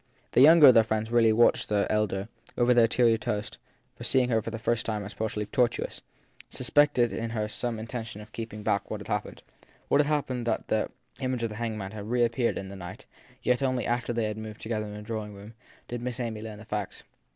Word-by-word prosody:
The - - +4
younger 155 0 +9
of - - +8
the 115 - +6
friends 110 +1 -2
really 115 -2 +5
watched 115 +2 +3
the 105 -1 +2
elder, 105 -2 0 0.3
over 125 0 +4
their 120 -2 +5
tea 125 +2 +1
and 115 - 0
toast, 105 0 -3 0.4
as - - -12
if - - -2
seeing 125 -2 +3
her 115 -2 +2
for 110 - -5
the 115 - -5
first 115 +1 0
time 105 -2 -2
as 100 - -8
possibly 110 -1 -3
tortuous, 120 +1 -1 0.5
suspecting 130 -1 +3
in 115 0 -3
her 110 -2 -2
some 120 +1 -3
intention 110 -1 -6
of 105 0 -12
keeping 110 -2 -7
back 100 - 0
what - - -4
had - - -10
happened. - - -3 0.5
What - - +4
had 145 - -1
happened 130 -5 -1
was 110 - 0
that 110 - +1
the - - -16
image 130 -2 -1
of 115 - 0
the 105 - -8
hanged 115 -2 -3
man 95 -2 -5
had 105 0 -7
reap 120 -1 +2
peared 120 0 0
in 95 - -5
the 100 - -8
night; 95 +6 -9 0.4
yet 125 +2 +2
only 130 -2 0
after 120 0 -1
they 115 -1 -1
had 105 0 -3
moved 110 0 -8
together 110 -1 -3
to - - -8
the 105 0 -8
drawing 105 -1 -5
room 100 +3 -11 0.3
did 120 -1 -5
Miss 125 0 -4
Amy 115 -3 -3
learn 110 -1 -7
the 110 - -12
facts. 105 -3 -4
115 Hz, 240 wpm, -28 LUFS, 105-120 Hz, 0.5 s, younger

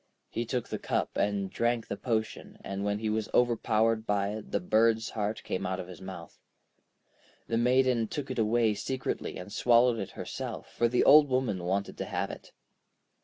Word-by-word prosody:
He 120 - -2
took 125 -1 -2
the - - -3
cup - - -2
and 100 -1 0
drank 120 -1 0
the - - -3
potion, 110 +1 -3
and 100 0 -4
when 100 0 0
he 110 +1 -3
was 110 0 -1
overpowered 115 -2 +2
by 100 -1 +1
it 105 0 -6
the - - +1
bird's 115 -8 +2
heart 105 0 -3
came 95 - -3
out 95 0 -2
of 90 - -6
his 90 -3 -11
mouth. 95 -3 -9 1.1
The 115 - 0
Maiden 125 -1 +3
took 135 +3 -4
it 130 - -3
away 110 0 +3
secretly 130 +5 -3
and 90 +3 -8
swallowed 120 0 +4
it 95 - -4
herself, - - -6
for 120 - +2
the 125 +1 +2
Old 145 0 +7
Woman 125 -8 0
wanted 100 +2 -2
to - - -2
have - - -2
it. - - -11
110 Hz, 185 wpm, -29 LUFS, 100-120 Hz, 1.1 s, Old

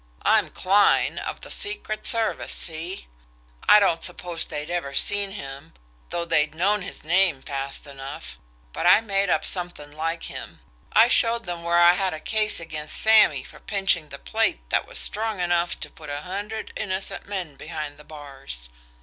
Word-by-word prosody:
I'm - - +3
Kline, 200 +2 +3
of - - -6
the - - -9
secret 400 - -2
service 230 -1 +1
see? 170 +3 -5 0.6
I 210 - +9
don't 170 -5 +2
suppose 175 -2 +1
they'd 150 +2 -5
ever 140 -6 -3
seen 205 -1 +2
him, 140 -3 -9 0.3
though 170 0 -2
they'd 155 -2 +2
know 200 +5 +2
his 195 0 -7
name 170 -3 +3
fast 135 +1 -5
enough, 140 0 -8 0.3
but - - 0
I 215 - +7
made 200 -3 0
up - - +1
something 175 -5 -1
like 165 +2 -3
him. - - -8 0.3
I 225 +2 +6
showed 235 -1 +4
them 175 -1 -5
where 170 0 +1
I 175 0 +7
had 185 -2 -1
a - - -7
case 215 +5 +1
against 155 -2 -6
Sammy 220 0 +5
for - - -14
pinching 195 -6 0
the - - -8
plate - - -1
that - - +1
was - - -9
strong 220 -1 -1
enough 175 0 0
to - - -3
put 155 -2 -12
a 145 0 -4
hundred 205 +5 -5
innocent 190 -2 -4
men 180 -8 -4
behind 150 0 -6
the 150 - -14
bars. 135 - -9
175 Hz, 175 wpm, -24 LUFS, 150-200 Hz, 0.6 s, I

